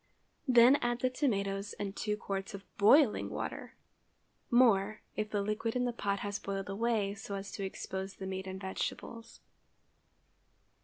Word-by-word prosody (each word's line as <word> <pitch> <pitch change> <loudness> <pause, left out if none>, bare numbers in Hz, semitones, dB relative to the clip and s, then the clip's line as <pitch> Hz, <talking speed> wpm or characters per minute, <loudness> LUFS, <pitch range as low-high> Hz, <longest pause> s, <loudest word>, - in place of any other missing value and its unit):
Then 250 +2 +7
add 240 -1 -1
the 255 - +2
tomatoes 200 -7 -1
and 200 -1 -5
two 210 -1 -1
quarts 195 0 -4
of 195 0 -10
boiling 235 +4 +5
water—more, 215 -4 -1
if 215 0 -2
the 205 -1 -1
liquid 215 +3 -2
in 250 0 +1
the 245 - -1
pot 200 -3 -1
has 205 0 -3
boiled 195 0 -4
away 210 -1 0
so 200 0 -6
as 195 0 -6
to 200 - -5
expose 190 0 -5
the 190 - -7
meat 190 0 -4
and 190 0 -5
vegetables. 225 +4 -5
205 Hz, 150 wpm, -32 LUFS, 195-235 Hz, -, Then